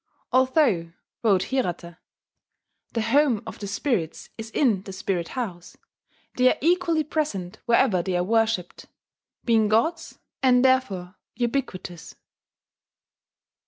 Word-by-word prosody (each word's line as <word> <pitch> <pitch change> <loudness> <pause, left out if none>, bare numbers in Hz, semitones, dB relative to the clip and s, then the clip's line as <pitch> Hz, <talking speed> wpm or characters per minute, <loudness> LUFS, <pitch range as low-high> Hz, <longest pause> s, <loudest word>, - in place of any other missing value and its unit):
"Although," 255 - +2 0.3
wrote 195 -5 +3
Hirata, 175 -9 -3 0.9
"the 230 - 0
home 245 -1 +2
of 220 - -8
the 205 - -5
spirits 200 - -2
is 225 0 -7
in 225 -6 +2
the 195 0 -9
Spirit 185 -2 -2
house, 180 -8 -5 0.6
they 255 0 +5
are - - -2
equally 335 0 +2
present 265 - -3
wherever 235 -5 +3
they 180 0 -1
are 175 - +1
worshipped, 225 -3 0 0.6
being 225 -3 +3
gods, 230 +11 0 0.2
and 255 -1 +4
therefore 205 -9 +1 0.2
ubiquitous." 230 -9 -3
225 Hz, 115 wpm, -25 LUFS, 185-260 Hz, 0.9 s, they